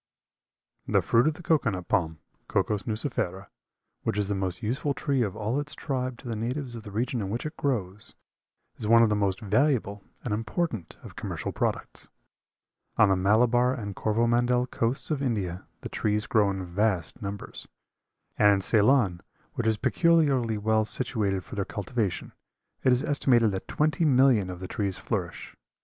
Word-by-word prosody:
The - - +2
fruit 120 +4 +3
of 155 - +1
the 175 - -12
cocoa 155 -7 +2
nut 95 -3 -5
palm, 80 -3 0 0.3
(Cocos 105 -2 0
nucifera), 105 -5 -2 0.5
which - - -2
is 105 -1 0
the - - +1
most 95 +2 -2
useful 135 +5 -1
tree 140 -3 0
of 105 -4 -1
all 110 +5 -1
its 145 +1 -5
tribe 130 -4 -3
to 125 - -11
the 115 - -2
natives 125 +4 -3
of 115 - -7
the 105 - -10
regions 120 +3 -1
in 95 - -3
which 115 +7 -3
it 155 +1 -5
grows, 105 -7 -2 0.6
is 105 - -4
one 115 +1 +7
of 115 - +4
the 105 - +2
most 100 0 0
valuable 110 -2 +1 0.2
and 115 - -2
important 110 - -3
of - - -11
commercial - - -4
products. - - -3 0.9
On 105 - +6
the 95 - +4
Malabar 120 +6 +3
and 100 -5 -6
Corvomandel 120 +3 +2
coasts 120 +7 -1
of 145 -3 0
India 100 -9 -2
the - - -5
trees 105 0 0
grow 105 -3 +3
in 95 -1 -3
vast 95 +2 -1
numbers; 100 0 -6 0.7
and 105 -1 +6
in 100 - +1
Ceylon, 105 -3 +3 0.3
which 115 - -2
is 110 -1 +2
peculiarly 140 -8 +2
well 110 +1 +2
situated 105 -5 0
for - - -13
their 100 - -1
cultivation, 100 +1 -3 0.5
it 130 - +4
is 125 +2 +2
estimated 125 -7 +3
that 95 - -5
twenty 155 +2 +1
millions 130 - +4
of 90 0 -7
the 95 - -5
trees 100 -2 -2
flourish. 90 -6 -4
110 Hz, 175 wpm, -27 LUFS, 100-125 Hz, 0.9 s, one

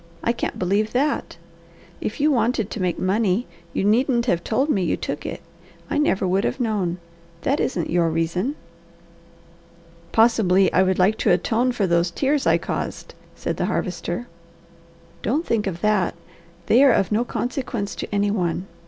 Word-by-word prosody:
I 235 - +2
can't 235 - -3
believe 200 +4 0
that. 280 +4 0 0.6
If - - -4
you 300 +2 +3
wanted 235 -4 +1
to 215 - -4
make 180 -1 0
money 200 +3 +1 0.3
you - - -1
needn't 235 +3 +2
have 175 -8 +1
told 260 +6 +1
me 215 -11 +1
you 175 - 0
took - - -4
it. - - -6 0.5
I - - +1
never 195 -10 +1
would 190 +2 +1
have - - -1
known. 205 -7 -1 0.4
That 280 - 0
isn't 175 -10 -1
your 170 -1 +2
reason!" 170 - -1 1.6
"Possibly 200 -5 +4
I 185 - +5
would 190 0 +2
like 195 +4 +3
to - - +2
atone 245 +3 +2
for 215 -5 0
those 170 0 +2
tears 275 +10 0
I - - +5
caused," - - -5 0.2
said - - -3
the - - 0
Harvester. 240 - -3 1.0
"Don't 295 +9 0
think 215 -3 0
of 175 -3 -4
that! 210 -5 +1 0.5
They 245 +9 +5
are 275 - +7
of 195 - +1
no 220 +3 +2
consequence 240 -4 -3
to - - -4
any 205 0 +1
one. 180 -3 -1
210 Hz, 170 wpm, -22 LUFS, 185-245 Hz, 1.6 s, are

